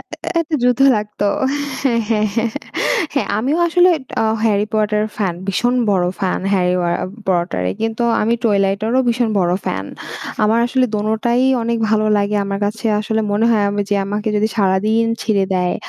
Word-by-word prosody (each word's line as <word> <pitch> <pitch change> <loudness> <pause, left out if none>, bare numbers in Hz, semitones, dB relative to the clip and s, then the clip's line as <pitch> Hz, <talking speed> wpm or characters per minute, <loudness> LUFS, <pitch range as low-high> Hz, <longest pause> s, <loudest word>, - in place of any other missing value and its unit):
এ - - -11
এ - - -10
একটা 325 -1 -3
যুদ্ধ 250 +1 +2 0.2
লাগতো। 210 0 -3 0.6
হ্যাঁ, 240 -4 +2
হ্যাঁ, 215 -2 +1
হ্যাঁ। 230 0 0 0.6
হ্যাঁ, 280 - 0
আমিও 275 +9 0
আসলে 355 +2 +4 0.3
আ - - +1 0.2
'Harry 210 -2 +2
Potter' 210 0 +1
ফ্যান, 195 -5 -1
ভীষণ 240 +6 0 0.2
বড় 180 -3 +2
ফ্যান। 190 -2 -1
Harry 180 -1 +2
আ - - 0 0.4
Potter 175 - 0 0.2
কিন্তু 225 +1 -2 0.2
আমি 230 +2 +2
Twilight 200 -3 +1
এরও 250 +3 +2
ভীষণ 235 -1 +1
বড় 175 -2 +1
ফ্যান। - - -2 0.6
আমার 215 +2 +3
আসলে 255 +1 +1
দোনোটাই 220 +4 0 0.2
অনেক 230 0 -1
ভালো 215 0 +2
লাগে। 205 +1 0
আমার 195 0 -3
কাছে 215 +2 -4
আসলে 220 +1 -1
মনে 210 +2 +1
হয় 215 -3 +2
আমি 205 0 -2
যে - - +3
আমাকে 210 +2 -2
যদি 215 +1 +1
সারাদিন 210 +3 +2 0.2
ছেড়ে 200 -4 +1
দেয় 180 -1 0
215 Hz, 175 wpm, -18 LUFS, 200-230 Hz, 0.6 s, আসলে